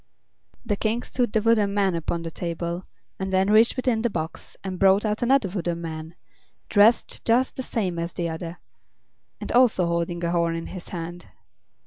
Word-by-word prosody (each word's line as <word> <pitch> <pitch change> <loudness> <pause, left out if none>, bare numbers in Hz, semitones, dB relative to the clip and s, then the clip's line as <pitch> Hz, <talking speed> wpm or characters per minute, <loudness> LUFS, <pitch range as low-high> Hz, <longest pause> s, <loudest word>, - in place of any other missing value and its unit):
The 210 -3 0
King 220 +3 -1
stood 245 -4 -1
the 215 -1 +1
wooden 215 -3 +3
man 195 -2 +2
upon 170 0 -2
the 165 - -5
table 170 +1 -4 0.3
and 190 0 -3
then 190 +2 +2
reached 220 +2 +5
within 250 -3 +1
the 240 - +1
box 160 -5 -6
and 185 -2 -5
brought 195 +2 +5
out 215 0 -1
another 255 -2 +3
wooden 175 -2 -3
man, 160 0 -6 0.5
dressed 215 +3 +3
just 245 +3 +2
the - - -3
same 190 -9 -2
as 170 0 -3
the 170 - -2
other, 165 +1 -5 0.8
and - - -5
also 240 -7 +4
holding 170 0 -1
a 170 - 0
horn 170 -1 +1
in 165 - -4
his 185 -2 -8
hand. 175 0 -6
190 Hz, 180 wpm, -25 LUFS, 170-220 Hz, 0.8 s, reached